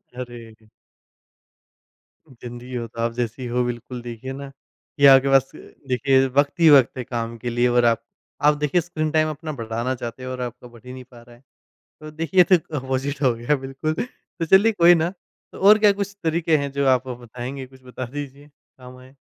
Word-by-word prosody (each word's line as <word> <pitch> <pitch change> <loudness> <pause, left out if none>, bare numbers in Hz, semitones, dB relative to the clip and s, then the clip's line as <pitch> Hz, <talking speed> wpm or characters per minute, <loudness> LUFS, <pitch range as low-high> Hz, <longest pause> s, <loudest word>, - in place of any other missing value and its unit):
अरे। 115 -3 -10 1.7
जिंदगी 120 +1 -8
हो 120 -1 -4
तो 115 +1 -13
आप 115 0 0
जैसी 120 +1 -4
हो 125 +1 0
बिल्कुल 120 +1 -6
देखिए 120 +2 -7
ना, 140 0 -8
कि 140 +1 -4
आपके 135 0 +7
पास 135 -1 +3 0.4
देखिए 135 +1 +2
वक़्त 140 +2 +1
ही 165 - +6
वक़्त 135 -4 +5
है 125 - -3
काम 115 -1 -5
के 120 +1 -5
लिए 120 +1 +1
और 120 0 +3
आप 115 -1 +2 0.4
आप 150 - +6
देखिए 150 +4 +1
स्क्रीन 155 -2 -3
टाइम 155 0 +2
अपना 155 +1 -6
बढ़ाना 115 +3 -3
चाहते 120 +1 -7
हो 130 - -5
और 125 - -5
आपका 125 0 -7
बढ़ 120 -1 -17
ही 125 - -9
नहीं 130 0 -9
पा 120 -2 -17
रहा 120 0 -17
है। 120 - -24 0.6
तो 155 0 -9
देखिए 165 +4 -1
ये - - +10
तो 185 - +4
एक 165 - -4
अपोजिट 135 +2 -3
हो 130 -3 +3
गया 120 +6 0
बिल्कुल। 135 +3 -4
तो 170 -4 -7
चलिए 195 +6 +5
कोई 175 -3 +6
ना, 165 +1 0 0.4
तो - - -12
और 205 +2 +7
क्या 210 -1 +5
कुछ 200 0 -5
तरीके 160 -1 +1
हैं 140 -1 -3
जो 140 0 -1
आप 130 0 +2
बताएँगे 125 +2 -7
कुछ 130 0 -20
बता 125 0 -7
दीजिए 140 +2 -8
काम 130 -3 -17
आएँ। 130 +2 -17
130 Hz, 205 wpm, -22 LUFS, 120-150 Hz, 1.7 s, ये